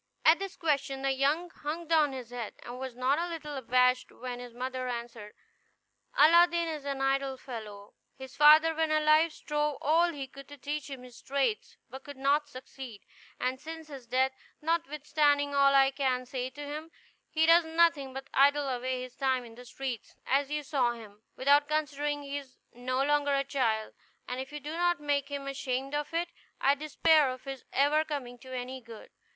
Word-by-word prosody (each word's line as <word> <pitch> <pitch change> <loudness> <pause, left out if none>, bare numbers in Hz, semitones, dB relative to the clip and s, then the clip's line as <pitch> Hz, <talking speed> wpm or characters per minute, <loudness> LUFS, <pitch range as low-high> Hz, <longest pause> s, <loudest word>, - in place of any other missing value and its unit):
At 320 +3 +7
this 390 -1 -5
question 280 -5 -1
the 270 - +2
youth 290 +6 +1
hung 315 +3 -4
down 310 -3 +4
his 255 -3 -7
head, 240 -3 -5
and 245 +1 -8
was 260 -2 -6
not 260 +4 +1
a 345 - -1
little 305 -3 -6
abashed 250 0 +2
when 245 -1 -6
his 245 -1 -8
mother 255 +1 -3
answered, 235 -3 -6 0.8
"Aladdin 340 +2 +6
is 305 -3 -5
an 275 -1 -3
idle 270 0 0
fellow. 215 -6 -9 0.2
His 265 0 -10
father, 310 +2 +7
when 320 0 0
alive, 310 +1 +4
strove 295 -1 -2
all 335 +3 +3
he 285 -4 -5
could 275 +1 -13
to 290 - -11
teach 290 +2 -4
him 265 -2 -8
his 250 -1 -13
trade, 280 +10 0 0.3
but 265 0 -10
could 285 -1 -10
not 290 +2 +1
succeed; 255 -4 -10 0.4
and 255 +1 -1
since 320 +1 -9
his 270 -5 -10
death, 260 +2 +2 0.3
notwithstanding 300 -2 +1
all 275 0 +5
I 270 0 +6
can 260 -2 0
say 250 0 -4
to 285 +3 -11
him, 305 +3 -6 0.4
he 315 0 +2
does 335 +1 +7
nothing 320 -4 +2
but 270 +1 -7
idle 285 +1 +4
away 255 0 -2
his 255 -1 -10
time 260 -2 0
in 230 - -12
the 245 +2 -12
streets, 250 -2 -6
as 275 +1 +1
you 300 0 -2
saw 270 -5 +1
him, 215 -3 -13
without 285 +2 +4
considering 295 -1 -1
he 285 0 -3
is 265 -2 -16 0.2
no 255 +2 -1
longer 290 -1 +2
a 275 - +1
child; 235 -6 -1 0.3
and 250 +1 -4
if 265 +2 -6
you 295 - -6
do 295 +2 -7
not 350 0 +1
make 285 -1 -1
him 280 -1 -5
ashamed 270 -1 -3
of 295 0 -2
it, 335 +1 -1 0.3
I 275 - +4
despair 305 0 +3
of 255 0 -6
his 270 -1 -7
ever 295 +3 +3
coming 270 -6 -5
to 260 +2 -12
any 255 +1 -5
good. 230 -2 -12
275 Hz, 190 wpm, -30 LUFS, 255-300 Hz, 0.8 s, At